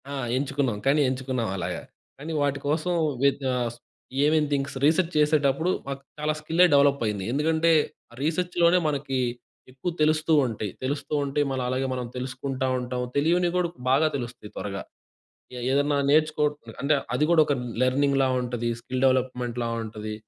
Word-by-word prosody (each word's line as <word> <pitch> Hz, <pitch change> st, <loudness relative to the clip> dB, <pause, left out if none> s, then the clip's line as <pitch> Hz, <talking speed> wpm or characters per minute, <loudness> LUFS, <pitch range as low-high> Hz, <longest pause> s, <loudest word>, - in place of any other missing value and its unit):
ఆ! -, -, -5 dB, 0.2 s
ఎంచుకున్నాం. 135 Hz, -4 st, -1 dB
కానీ 140 Hz, +3 st, +4 dB
ఎంచుకున్నాం 130 Hz, -3 st, -2 dB
అలాగ. 85 Hz, -, -3 dB, 0.4 s
కానీ 150 Hz, +4 st, -7 dB
వాటి 140 Hz, -1 st, 0 dB
కోసం 155 Hz, +4 st, 0 dB, 0.3 s
వ్యె 140 Hz, 0 st, +5 dB, 0.2 s
ఆహ్, 120 Hz, -2 st, -1 dB, 0.5 s
ఏమేం 155 Hz, +1 st, +3 dB
థింగ్స్ 140 Hz, -1 st, -1 dB
రీసెర్చ్ 165 Hz, +3 st, +3 dB
చేసేటప్పుడు 150 Hz, +1 st, +2 dB, 0.2 s
మాకు 140 Hz, 0 st, -5 dB, 0.2 s
చాలా 150 Hz, 0 st, 0 dB
స్కిల్లే 165 Hz, +4 st, +4 dB
డెవలప్ 140 Hz, -1 st, +4 dB
అయింది. 105 Hz, -3 st, -2 dB
ఎందుకంటే 160 Hz, +4 st, +2 dB, 0.5 s
రీసెర్చ్‌లోనే 170 Hz, +3 st, +2 dB
మనకి 140 Hz, -3 st, -1 dB, 0.5 s
ఎక్కువ 135 Hz, +7 st, -4 dB
తెలుస్తూ 155 Hz, +1 st, +3 dB
ఉంటాయి. 110 Hz, -4 st, -3 dB
తెలుస్తూ 140 Hz, +3 st, -3 dB
ఉంటే 140 Hz, +1 st, 0 dB
మళ్ళీ 130 Hz, -1 st, -2 dB
అలాగే 130 Hz, +1 st, -1 dB
మనం 125 Hz, -1 st, -3 dB
తెలుసుకుంటా 130 Hz, +1 st, -3 dB
ఉంటాం. 125 Hz, 0 st, -3 dB
తెలియనివి 170 Hz, +4 st, +2 dB
కూడా 180 Hz, -1 st, +1 dB, 0.2 s
బాగా 140 Hz, +4 st, +4 dB
తెలుస్తాయి 120 Hz, -5 st, -6 dB
త్వరగా. 100 Hz, -1 st, -4 dB, 0.8 s
ఏ -, -, -5 dB
ఏదన్నా 145 Hz, +1 st, +2 dB
నేర్చుకో 155 Hz, 0 st, +3 dB, 0.4 s
అంటే 145 Hz, +2 st, +3 dB, 0.2 s
అది 145 Hz, -, +2 dB
కూడా 170 Hz, -2 st, +6 dB
ఒక 145 Hz, -, +1 dB, 0.3 s
లెర్నింగ్‌‌లా 135 Hz, +1 st, +2 dB
ఉంటది. 120 Hz, -1 st, -2 dB
స్కిల్ 130 Hz, +2 st, -4 dB
డెవలప్మెంట్‌లా 125 Hz, -2 st, 0 dB, 0.2 s
ఉంటది. 110 Hz, -1 st, -6 dB
140 Hz, 145 wpm, -26 LUFS, 125-155 Hz, 0.8 s, కూడా